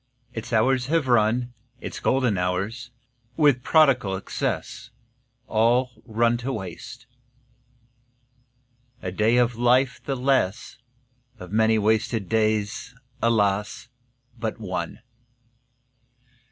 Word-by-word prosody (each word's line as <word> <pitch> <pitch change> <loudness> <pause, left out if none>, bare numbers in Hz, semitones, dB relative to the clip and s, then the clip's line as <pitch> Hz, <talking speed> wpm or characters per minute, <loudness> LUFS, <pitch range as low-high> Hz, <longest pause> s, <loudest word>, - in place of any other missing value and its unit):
Its 115 0 -6
hours 125 +3 +2
have 160 -2 +1
run, 120 +1 +2 0.3
Its - - -7
golden 130 -5 +1
hours, 95 +8 -2 0.5
with 145 -5 +4
prodigal 130 -9 +3
excess, 100 +4 -4 0.6
All 120 +3 +2 0.2
run 115 +1 +2
to 125 +3 -4
waste. 110 +3 -7 2.0
A 90 - -3
day 110 +5 +2
of 120 -1 +2
life 125 +2 +2
the 135 - -2
less; 130 -4 0 0.6
Of 90 -3 -10
many 110 +1 +3
wasted 110 0 0
days, 110 +1 0 0.3
alas, 105 -1 0 0.5
but 110 0 -3
one! 90 -5 -5
115 Hz, 100 wpm, -24 LUFS, 105-125 Hz, 2.0 s, with